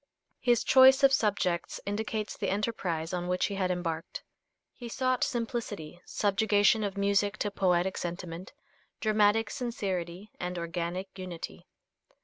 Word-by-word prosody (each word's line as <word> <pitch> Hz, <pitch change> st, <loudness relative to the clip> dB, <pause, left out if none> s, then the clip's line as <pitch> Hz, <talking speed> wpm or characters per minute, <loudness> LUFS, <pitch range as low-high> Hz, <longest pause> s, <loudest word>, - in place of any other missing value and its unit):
His 240 Hz, -3 st, +2 dB
choice 265 Hz, +1 st, +7 dB
of 275 Hz, 0 st, +7 dB
subjects 200 Hz, -7 st, 0 dB
indicates 215 Hz, +1 st, -3 dB
the -, -, -2 dB
enterprise 185 Hz, -6 st, -2 dB
on 175 Hz, 0 st, -2 dB
which 180 Hz, 0 st, +1 dB
he 205 Hz, -, -3 dB
had 190 Hz, -2 st, 0 dB
embarked. 170 Hz, -3 st, -3 dB, 0.5 s
He 240 Hz, -2 st, -8 dB
sought 255 Hz, +1 st, 0 dB
simplicity, 220 Hz, -8 st, -3 dB
subjugation 205 Hz, +1 st, +2 dB
of 200 Hz, -1 st, -3 dB
music 200 Hz, +1 st, +1 dB
to 205 Hz, -, -1 dB
poetic 185 Hz, -1 st, +1 dB
sentiment, 175 Hz, 0 st, -6 dB, 0.5 s
dramatic 215 Hz, 0 st, +3 dB
sincerity 195 Hz, -5 st, -4 dB
and 180 Hz, 0 st, -3 dB
organic 175 Hz, +3 st, -4 dB
unity. 180 Hz, -3 st, -7 dB
200 Hz, 125 wpm, -29 LUFS, 180-220 Hz, 0.5 s, choice